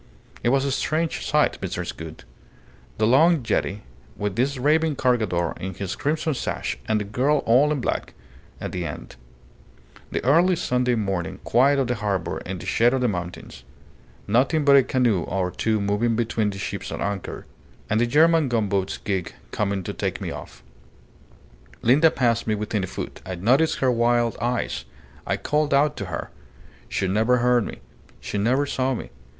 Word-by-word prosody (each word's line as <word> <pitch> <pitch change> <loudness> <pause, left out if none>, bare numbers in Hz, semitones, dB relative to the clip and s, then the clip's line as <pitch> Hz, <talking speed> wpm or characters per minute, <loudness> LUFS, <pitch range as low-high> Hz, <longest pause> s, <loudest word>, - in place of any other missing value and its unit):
It 120 - +1
was 135 +2 +2
a 140 - 0
strange 155 +4 -1
sight, - - +1
Mrs. - - -4
Gould: 80 -1 -9 0.7
the 110 - +2
long 150 +5 +4
jetty, 105 -2 -1 0.3
with 105 -2 -2
this 135 +3 0
raving 155 +3 +2
Cargador 110 -11 +1
in 95 0 -5
his 95 -1 -4
crimson 155 +1 -1
sash 130 - -3
and 110 -1 +2
the - - -2
girl 135 +8 +1
all 130 +6 +4
in 145 -4 -1
black, - - -3 0.4
at - - -5
the - - -3
end; - - -7 0.9
the - - -3
early 170 +7 +4
Sunday 125 -6 +1
morning 95 -6 -2
quiet 135 +4 +4
of 135 - +2
the 125 - 0
harbour 100 -6 -2
in 95 0 -4
the - - -9
shade 120 +3 +3
of 130 - -1
the 125 - +2
mountains; 90 - -5 0.6
nothing 135 +8 +2
but 140 -1 +7
a 135 - +8
canoe 125 -7 +1
or 90 0 -2
two 110 +2 0
moving 105 +3 +1
between 115 -2 0
the 100 - -6
ships 95 - -5
at - - -4
anchor, 100 -2 -4 0.4
and 110 +2 +1
the 120 - +2
German 160 +2 +4
gunboat's 100 -5 0
gig 95 -5 -3 0.2
coming 100 -2 -1
to - - -5
take - - -3
me - - -4
off. - - -10 1.2
Linda 145 +7 +5
passed 115 -5 0
me 110 - +1
within 105 -1 -2
a - - -2
foot. - - -7
I 95 - -5
noticed 130 - +2
her 130 -1 +4
wild 120 0 +2
eyes. 120 - -2 0.4
I - - 0
called 150 -1 +1
out 145 +1 +3
to 100 - -4
her. 95 - -5 0.6
She 95 - -1
never 110 +6 +2
heard 120 -1 +3
me. - - -9 0.4
She 105 - -4
never 130 +7 +2
saw 130 -2 0
me. - - -7
120 Hz, 180 wpm, -24 LUFS, 100-135 Hz, 1.2 s, a